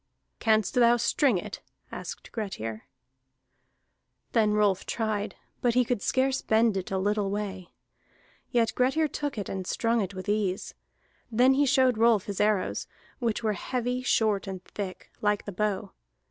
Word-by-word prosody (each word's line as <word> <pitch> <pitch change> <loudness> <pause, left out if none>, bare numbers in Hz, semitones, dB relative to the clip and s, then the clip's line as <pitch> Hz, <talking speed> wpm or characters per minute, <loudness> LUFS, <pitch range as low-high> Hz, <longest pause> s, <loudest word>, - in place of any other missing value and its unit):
"Canst 220 -2 +2
thou 240 -1 +5
string 240 -1 +2
it?" - - -6 0.3
asked - - -7
Grettir. 115 - -5 1.5
Then 215 -3 +3
Rolf 205 -3 +2
tried, 215 -2 -2 0.3
but 240 -1 +2
he 250 -1 +4
could 240 -3 -1
scarce 265 0 +1
bend 220 -1 +3
it 190 -1 -3
a 195 - -1
little 205 +1 0
way. 195 -3 -4 0.8
Yet 230 -2 +2
Grettir 270 +5 +2
took 290 -2 -4
it 205 - -3
and 190 -1 -4
strung 230 0 +1
it 195 0 -4
with 185 +2 -7
ease. 205 -3 -1 0.6
Then 250 +4 +5
he 285 +1 +3
showed 260 -4 +3
Rolf 225 -4 +4
his 200 -1 -3
arrows, 210 -2 +1 0.3
which 235 -2 -1
were 215 -1 +1
heavy, 250 +5 -2
short, 215 -5 +1
and 190 -2 -6
thick, 190 -3 -7
like 210 -1 +1
the 205 - -5
bow. 200 0 -2
215 Hz, 155 wpm, -28 LUFS, 200-240 Hz, 1.5 s, thou